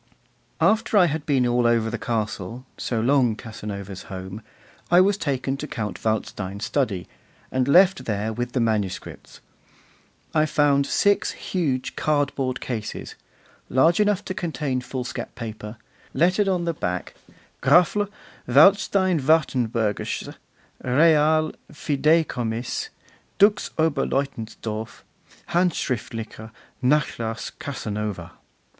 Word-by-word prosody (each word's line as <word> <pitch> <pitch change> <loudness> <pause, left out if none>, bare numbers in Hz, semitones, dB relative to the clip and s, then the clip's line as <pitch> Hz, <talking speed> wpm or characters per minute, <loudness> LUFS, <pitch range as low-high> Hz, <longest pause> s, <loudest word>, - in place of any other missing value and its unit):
After 220 0 +3
I 185 - +7
had 155 -2 -2
been 135 -4 +3
all 120 0 +2
over 115 -1 +2
the 115 - -4
castle, 115 +2 -3
so 115 - -2
long 125 -1 +3
Casanova's 100 -3 -7
home, 95 +2 -7 0.5
I 175 - +6
was 195 +2 +4
taken 140 -6 -2
to 150 - -5
Count 105 -6 -5
Waldstein's 100 -2 -2
study, 105 -11 -1 0.4
and 130 0 +1
left 185 +6 +5
there 110 0 -2
with 120 +2 -4
the 130 - +1
manuscripts. 105 -5 -3 0.9
I 155 0 +3
found 140 -2 +3
six 205 0 +2
huge 140 -9 -2
cardboard 140 -4 0
cases, 110 -4 -5 0.6
large 165 +8 +4
enough 210 -2 +2
to - - -3
contain 150 -8 -2
foolscap 125 0 -5
paper, 110 -1 -7 0.4
lettered 185 +5 +3
on 180 -3 0
the 170 - 0
back: 90 - -3 0.5
'Grafl. 200 +4 +4 0.4
Waldstein 185 +5 +5
Wartenberg'sches 125 -8 0 0.5
Real 155 +3 +4 0.2
Fideicommiss. 145 - 0 0.5
Dux 205 +1 +4
Oberleutensdorf: 135 -7 -2 0.5
Handschriftlicher 115 - -2 0.3
Nachlass 125 -5 0
Casanova. 105 - -4
130 Hz, 105 wpm, -24 LUFS, 110-160 Hz, 0.9 s, I